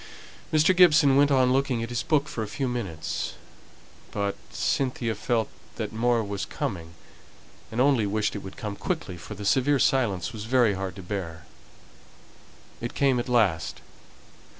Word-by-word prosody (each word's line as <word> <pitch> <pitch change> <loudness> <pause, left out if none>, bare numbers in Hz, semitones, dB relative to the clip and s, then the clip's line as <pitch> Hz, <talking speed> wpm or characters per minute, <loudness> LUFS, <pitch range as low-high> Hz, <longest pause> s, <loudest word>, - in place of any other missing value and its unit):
Mr. 155 +4 +4
Gibson 155 -6 +6
went 145 +1 +5
on 130 -2 +4
looking 130 -3 +1
at 115 - -5
his 120 - -1
book 150 -2 +1
for 115 - -4
a 110 - -3
few 130 +6 -2
minutes; 95 -11 -3 0.7
but 100 -1 -2
Cynthia 125 -4 -1
felt 110 +1 0 0.3
that - - -4
more 115 +1 +2
was 100 -1 -4
coming, 85 0 -5 0.8
and 110 - -3
only 130 -5 +3
wished 105 +1 0
it 105 - -4
would 95 - -10
come 105 -2 -4
quickly, 160 - -3
for 85 +5 -9
the 100 +1 -7
severe 135 +6 +3
silence 120 - +1
was 110 -1 -6
very 120 -3 +3
hard 95 -1 -4
to 95 - -9
bear. 85 -4 -5 1.4
It 120 - -5
came 135 -3 +3
at 120 - -4
last. 105 -10 +1
115 Hz, 160 wpm, -26 LUFS, 100-135 Hz, 1.4 s, Gibson